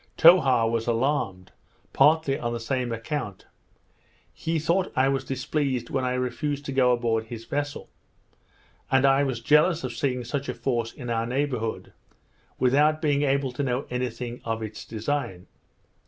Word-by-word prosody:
Towha 135 -9 +6
was 115 0 -1
alarmed, 115 -7 -1 0.4
partly 155 -3 +3
on 120 0 -2
the 120 - -3
same 125 +1 -2
account. 115 -3 -4 0.9
He 165 0 -2
thought 170 +5 0
I 130 0 +3
was 135 -1 0
displeased 135 0 -2
when 135 -1 0
I 125 0 0
refused 135 +3 -2
to 140 - -4
go 130 -2 +3
aboard 115 -2 0
his 115 0 -8
vessel; 145 +3 -3 1.0
and 135 0 +4
I 135 0 +5
was 130 -4 -2
jealous 155 +3 +3
of 125 -2 -3
seeing 125 0 -1
such 140 +4 -4
a - - -3
force 120 -3 -1
in 120 -2 -7
our 115 0 0
neighbourhood 125 -3 -2 0.6
without 150 +4 +3
being 145 -3 +1
able 140 -2 +1
to 125 - -4
know 130 0 -1
any 125 0 -1
thing 120 +1 -7
of 115 -1 -3
its 110 -1 -7
design. 115 -5 -3
130 Hz, 160 wpm, -26 LUFS, 115-145 Hz, 1.0 s, Towha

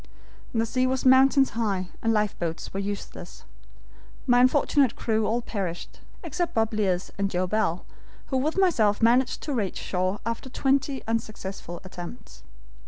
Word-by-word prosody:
The 225 -1 +1
sea 255 +3 +1
was 260 0 -1
mountains 265 +1 +6
high, 200 -5 -1
and 225 - +1
lifeboats 200 -6 -1
were 195 - -2
useless. 200 0 -6 0.8
My 245 -2 +5
unfortunate 265 -1 +3
crew 220 -2 0
all 235 +2 0
perished, 185 -7 -5 0.2
except 340 +2 -3
Bob 225 0 +2
Learce 190 -4 0
and 200 0 +1
Joe 185 -1 0
Bell, 185 -3 0 0.4
who 265 - +1
with 305 +7 0
myself 230 - +3
managed 245 +2 +3
to 295 - -3
reach 210 -7 -1
shore 185 +2 -1
after 230 +3 -3
twenty 270 +1 0
unsuccessful 200 -6 -4
attempts. 175 - -10
225 Hz, 145 wpm, -26 LUFS, 195-260 Hz, 0.8 s, mountains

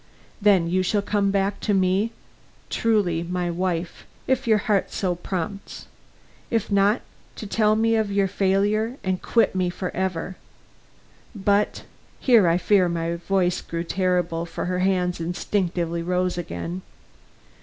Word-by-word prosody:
Then 195 -5 +4
you 185 +2 +1
shall 200 +2 0
come 205 -1 +1
back 195 0 0
to 205 - 0
me 190 +2 +2
my - - -4 0.6
true 200 -8 +1 0.3
wife, 175 -1 -3 0.2
if 260 -1 0
your 220 -2 +5
heart 205 -1 0
so 185 -3 -1
prompts; 185 +3 -5 0.6
if 225 -3 -1
not, 200 +3 +3 0.3
to - - -7
tell 215 +1 +2
me 225 +1 +2
of 215 -2 0
your 200 -1 +2
failure 205 +5 +1
and 185 -1 -1
quit 230 - +2
me 185 -1 0
for 180 +1 -4
ever. 185 0 -2 1.0
But 205 +1 +1 0.2
" - - -32
Here 230 -8 +5
I 165 +1 +3
fear 185 -1 +3
my 170 0 -2
voice 180 0 0
grew 165 0 -4
terrible, 175 -2 0
for - - -4
her 180 0 -1
hands 180 -2 +1
instinctively 170 -1 -1
rose 180 +1 0
again. 85 - -5
190 Hz, 145 wpm, -24 LUFS, 175-205 Hz, 1.0 s, your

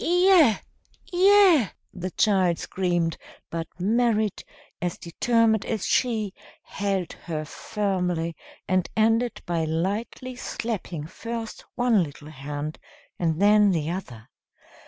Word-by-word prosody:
"Iya, 350 - +5 0.5
Iya!" 370 - +5 0.2
the 185 0 -4
child 185 -5 +3
screamed; 175 -3 -1 0.3
but 165 -1 -3
Merrit, 220 +1 +1 0.4
as 175 -1 -2
determined 225 +4 +2
as 220 -4 -2
she, 220 -6 +1 0.3
held 195 -3 -2
her 155 -3 -5
firmly, 180 -3 -2 0.3
and 185 -1 +1
ended 225 +2 +2
by 170 -2 0
lightly 200 +10 -2
slapping 205 -10 -4
first 230 +6 -6
one 245 -5 +3
little 150 -1 -6
hand 145 +1 -5 0.4
and 165 -2 0
then 205 +1 +6
the 165 -3 0
other. 125 - -7
195 Hz, 110 wpm, -25 LUFS, 170-230 Hz, 0.5 s, then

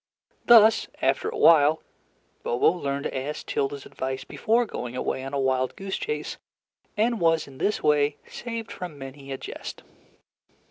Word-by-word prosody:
Thus, 225 -2 +7 0.2
after - - +1
a 445 - -6
while, 155 - +5 0.6
Bobo 120 +6 +3
learned 140 -5 -3
to - - -4
ask 140 +3 -4
Tilda's 140 0 -2
advice 130 0 -4
before 235 +2 +1
going 125 - -6
away 130 +1 -2
on 135 - -6
a 140 - -1
wild 130 -1 0
goose 195 0 -4
chase, 445 +2 -4 0.6
and 230 +1 +2
was 165 -2 +2
in 135 -1 -13
this 210 - 0
way 145 -1 +3
saved 230 -2 -6
from 175 -5 -7
many 135 0 -9
a 135 - -3
jest. - - -8
150 Hz, 155 wpm, -26 LUFS, 135-210 Hz, 0.6 s, Thus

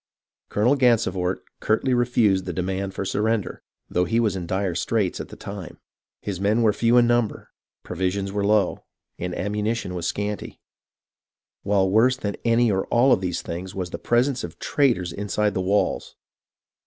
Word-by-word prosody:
Colonel 120 +7 +3
Gansevoort 105 -8 +1 0.2
curtly 120 +4 +1
refused 115 -6 +2
the 90 - -3
demand 95 +2 -3
for 100 - -3
sur 100 - -1
render, 110 -2 -1 0.3
though 90 +1 +1
he 115 +3 +1
was 110 -5 +1
in 90 -2 -4
dire 95 0 -1
straits 95 +3 -1
at - - -7
the - - -10
time. 100 -4 -8 0.5
His 95 -3 -4
men 105 +4 +2
were 110 -2 +4
few 115 +3 +3
in 120 - +6
number, 120 -2 0 0.3
provisions 95 +2 -2
were 100 0 -1
low, 105 -2 +2 0.4
and 90 0 -3
am 105 +3 -2
munition 105 -2 -2
was 85 -2 -3
scanty; 105 0 -4 1.0
while 100 -1 +2
worse 115 +6 +4
than 100 -5 -3
any 115 -1 +3
or 95 -1 -1
all 125 +3 +4
of - - +1
these 90 -2 -2
things 90 +3 -6
was 90 -2 -4
the - - -5
presence 125 +2 +1
of 85 - -7
traitors 115 - +1
inside 105 +2 -1
the 95 - -1
walls. 100 +3 0
100 Hz, 175 wpm, -24 LUFS, 95-115 Hz, 1.0 s, in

